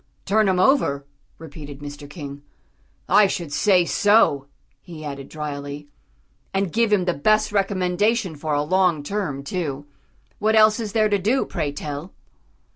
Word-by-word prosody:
"_ - - -41
"Turn 215 +1 +2
him 190 -1 +2
over?" 185 - +2 0.3
repeated 145 -3 -10
Mr. 145 0 -9
King. 145 -2 -8 0.7
"I 210 -1 +5
should 170 -6 -4
say 185 +1 +3
so," 205 -9 +3 0.3
he 165 -4 -10
added 140 -2 -7
drily, 145 -1 -6 0.7
"and 195 -3 0
give 230 -1 +2
him 195 -4 +3
the 175 - +1
best 215 +10 +2
recommendation 195 0 0
for 150 0 -2
a 145 - +1
long 180 -2 +2
term, 145 -6 -3
too. 145 -3 -4 0.5
What 220 +1 +2
else 215 +1 +5
is 215 -3 -4
there 215 -1 +3
to 205 -1 +1
do, 230 +8 +1
pray 155 -4 -3
tell?" 145 +4 -7
175 Hz, 155 wpm, -22 LUFS, 145-205 Hz, 0.7 s, I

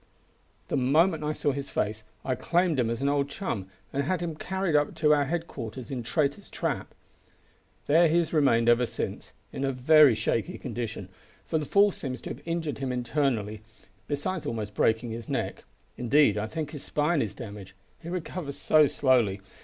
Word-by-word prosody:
"The - - 0
moment 155 +5 +3
I 150 - 0
saw 150 -1 0
his 140 0 -4
face 105 +1 -2 0.2
I 130 - +1
claimed 165 +4 +1
him 115 -2 +2
as 115 +3 -2
an - - +2
old 140 0 +1
chum, 120 - -4 0.3
and 140 - +1
had 175 +6 0
him 170 -1 -3
carried 190 0 -1
up 145 0 +2
to 150 -1 +4
our 145 -1 +3
headquarters 135 -7 -5
in 130 -2 -3
Traitor's 140 +4 -1
Trap. - - -3 0.9
There 165 +4 +5
he 165 +2 +2
has 170 -1 0
remained 130 -7 +3
ever 120 +1 +4
since, - - -5 0.2
in 135 - -3
a 135 - +1
very 140 0 +6
shaky - - -1
condition, 115 -5 -5 0.4
for 160 - 0
the 150 - -4
fall 200 +5 +5
seems 130 -7 -5
to - - -5
have - - -8
injured 165 -4 -2
him 135 -2 -2
internally, 120 -4 -1 0.5
besides 150 +5 -2
almost 105 -2 -3
breaking 115 +3 +1
his 115 0 -7
neck. - - -3 0.3
Indeed 125 -2 +4
I 105 +1 -2
think 155 +2 -4
his 150 - -7
spine 150 +1 +1
is 105 -4 -3
damaged, 100 -4 -9 0.3
he 170 - -7
recovers 170 -4 -4
so 155 -1 +5
slowly. 120 -9 +2
140 Hz, 185 wpm, -27 LUFS, 115-155 Hz, 0.9 s, very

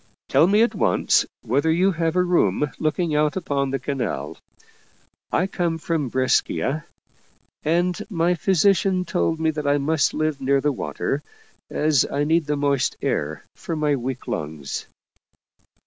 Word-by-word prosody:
" - - -69
Tell 165 - +5
me 210 +4 +4
at 235 - +1
once - - +2 0.2
whether 140 +7 +1
you 185 +4 +3
have 165 -1 -1
a 180 - +4
room 150 - +1
look 155 -1 0
ing 170 -4 0
out 150 0 +2
upon 140 -7 -1
the 135 - -1
canal. 135 0 -4 0.9
I 185 - +2
come 175 -4 -1
from 160 -4 -2
Brescia, 130 +3 0 0.8
and 175 +4 +1
my 175 -2 +1
physician 185 +1 +2
told 165 -2 0
me 160 0 +2
that 150 -2 -4
I 145 0 +3
must 145 0 +1
live 155 -2 -1
near 140 +1 +2
the 145 +2 +1
water, 140 +1 -3 0.5
as 150 -3 +2
I 145 +1 0
need 160 +1 +1
the 150 0 0
moist 140 -2 0
air 75 +1 -2
for 165 - -5
my 150 -2 +1
weak 130 0 -5
lungs." 75 -2 -4
155 Hz, 160 wpm, -23 LUFS, 140-170 Hz, 0.9 s, Tell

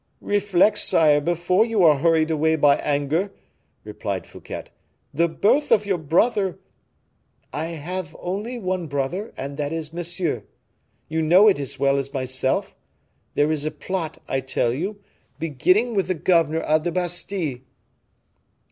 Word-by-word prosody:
"Reflect, 205 0 +2
sire, 150 -2 +4
before 175 +5 +2
you 225 -4 +1
are 150 -4 +6
hurried 160 0 +3
away 160 +1 +2
by 145 -2 +4
anger," 150 +7 -1 0.5
replied 105 -3 -4
Fouquet. - - -8 0.5
"The 170 +4 +2
birth 215 - +1
of 210 -1 +4
your 195 -3 0
brother 190 +5 +1 0.5
" - - -43
"I 150 +3 -2
have 165 +1 -5
only 205 +7 -4
one 185 -5 -2
brother 145 +9 -3
and 140 +1 -6
that 145 -1 -2
is 160 -1 -5
Monsieur. 175 -1 -2 0.7
You 160 +1 -1
know 180 +7 +6
it 195 -8 +4
as 140 -3 -5
well 140 0 +3
as 135 0 -5
myself. 130 0 -1 0.6
There 145 +1 +2
is 150 -2 -1
a 155 - 0
plot, 165 0 -4
I 135 - 0
tell 130 -3 0
you, 190 +10 -4 0.4
beginning 185 - +1
with 195 -5 0
the 185 - 0
governor 165 -1 +2
of 155 0 +1
the 175 - -1
Bastile." 175 -4 -2
165 Hz, 150 wpm, -23 LUFS, 145-185 Hz, 0.7 s, are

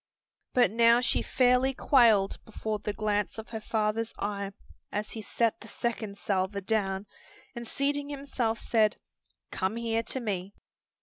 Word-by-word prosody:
But 245 -6 +4
now 230 +1 +5
she 250 - +2
fairly 255 +1 +3
quailed 225 -9 +4
before 220 -1 -4
the 210 - -3
glance 210 0 -1
of 220 +1 -7
her 220 -1 -5
father's 220 +1 -1
eye 200 -1 -3 0.4
as 210 +1 -3
he 225 - -5
set 230 +1 0
the 210 - -12
second 220 -3 -3
salver 195 0 -1
down 195 -1 -1 0.5
and 235 -1 -6
seating 285 +3 0
himself 270 -5 -2
said, 220 -2 +2 0.5
"Come 190 +3 -1
here 230 -1 0
to 260 - -3
me!" 200 -4 -3
220 Hz, 145 wpm, -29 LUFS, 205-235 Hz, 0.5 s, now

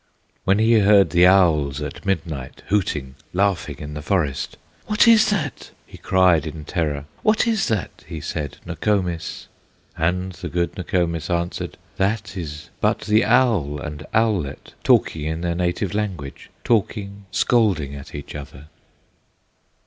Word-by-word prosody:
When 95 +1 +4
he 110 +1 +5
heard 100 -1 +5
the 90 0 +6
owls 80 -8 +4
at 75 +6 -6
midnight, 80 -8 -3
Hooting, 75 -10 0 0.2
laughing 95 -1 0
in 75 0 -7
the 75 - -5
forest, 75 -6 -1 0.3
"What 210 +2 +4
is 225 -2 +7
that?" 155 - -2 0.2
he - - -14
cried 90 -4 +3
in 75 -1 -7
terror, 75 -3 -2 0.2
"What 215 +1 +3
is 225 -3 +1
that," 110 -5 -3
he 80 -1 -6
said, 75 -2 -4
"Nokomis?" 90 -6 -2 0.5
And 90 +3 0
the 90 0 -7
good 85 0 -1
Nokomis 85 -3 -1
answered: 85 0 -2 0.2
"That 105 +2 -1
is 80 -1 -7
but - - +1
the 110 +1 +3
owl 110 - +2
and 75 +1 -6
owlet, 105 -11 0
Talking 75 -2 +3
in 80 +1 -2
their 85 -1 0
native 90 +2 -1
language, 95 -10 -4
Talking, 100 -3 -1
scolding 95 - +2
at 70 -1 -9
each 70 - -7
other." 75 0 -9
90 Hz, 140 wpm, -22 LUFS, 75-105 Hz, 0.5 s, is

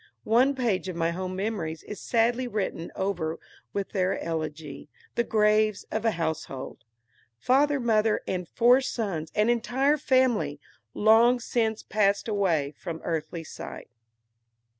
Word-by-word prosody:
One 255 +5 +4
page 220 -8 0
of 180 - -5
my 165 0 0
home 185 +1 -4
memories 190 -6 -3
is 210 - -8
sadly 240 +2 +1
written 200 -7 -3
over 175 -4 -2 0.3
with 200 -1 -3
their 190 -1 0
elegy, 155 -3 -5 0.2
the 235 - +1
"Graves 215 -2 +2
of 220 +1 -2
a 225 - +4
Household." 160 -8 -4 0.5
Father, 280 - +2
mother, 220 -3 +2
and 180 -2 -2
four 245 +3 +5
sons, 190 -12 -3
an 210 +1 +3
entire 260 +5 +2
family, 240 - +2 0.4
long 230 +3 +5
since 225 -2 -1
passed 200 -1 +1
away 170 -9 0
from 165 -3 -6
earthly 165 0 -3
sight.) 155 - -9
210 Hz, 135 wpm, -27 LUFS, 165-235 Hz, 0.5 s, four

